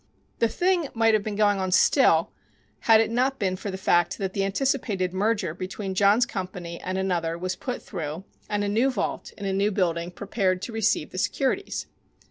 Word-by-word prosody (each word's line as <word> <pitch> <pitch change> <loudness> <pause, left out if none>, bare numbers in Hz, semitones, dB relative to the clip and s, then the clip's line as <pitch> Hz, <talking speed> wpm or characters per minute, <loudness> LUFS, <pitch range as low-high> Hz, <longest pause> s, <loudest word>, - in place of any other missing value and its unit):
The 230 - +4
thing 350 +4 +1
might 225 -1 +4
have 215 - +3
been 210 0 -4
going 205 -1 +3
on 185 -1 -1
still 185 - +4 0.5
had 225 -1 +5
it 225 0 +1
not 260 +3 +1
been 190 -2 0
for 200 +2 -6
the 190 - -4
fact 175 -2 +2
that 190 -1 -3
the 195 - 0
anticipated 195 -4 0
merger 200 -3 0
between 190 +2 -5
John's 205 +5 +4
company 180 -4 -6
and 185 +1 -3
another 175 -3 -1
was 185 +1 -3
put 250 - -5
through 165 -2 -5 0.3
and 205 -1 0
a - - -1
new 225 +6 +2
vault 260 - -3
in 205 - -6
a 195 - 0
new 200 +2 +2
building 175 -4 0
prepared 190 0 -1
to 230 - -5
receive 215 -8 0
the 185 - -5
securities. 275 - -1
195 Hz, 195 wpm, -25 LUFS, 185-225 Hz, 0.5 s, had